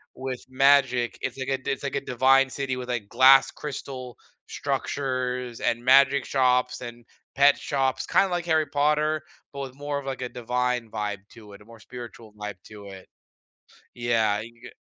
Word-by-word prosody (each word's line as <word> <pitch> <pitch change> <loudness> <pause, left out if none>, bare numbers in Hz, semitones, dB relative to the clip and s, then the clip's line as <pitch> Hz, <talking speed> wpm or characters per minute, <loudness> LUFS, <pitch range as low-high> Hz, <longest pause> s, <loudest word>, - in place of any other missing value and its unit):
with 130 -1 -5
magic, 130 -2 +3
it's 130 -1 -4
like 130 0 -4
a 135 - +1
d 130 - -3
it's 135 - -4
like 140 - -3
a - - -2
divine 135 +1 +3
city 135 -1 -3
with, 125 0 -7
like, 115 -5 -3
glass 130 +2 +6
crystal 130 -4 -7 0.3
structures 125 -3 -3
and 120 +1 -1
magic 135 +1 +5
shops 125 -2 +1
and 120 -1 -9 0.3
pet 140 +1 +5
shops, 135 -2 -1
kinda 195 - +3
like 175 -1 -2
Harry 160 -2 +2
Potter, 150 +2 +1 0.3
but 140 - -7
with 130 -2 -7
more 145 0 -3
of, 140 - -11
like, 135 -1 -5
a 125 - -3
divine 125 -1 -2
vibe 105 -2 -4
to 110 -3 -15
it, 100 - -14
a - - -17
more 115 0 -15
spiritual 115 -3 -11
vibe 105 -2 -7
to 105 -2 -12
it. 95 -1 -11 0.9
Yeah, 115 -3 +1
you 115 +2 -10
can 120 - -25
get - - -11
125 Hz, 185 wpm, -25 LUFS, 120-135 Hz, 0.9 s, glass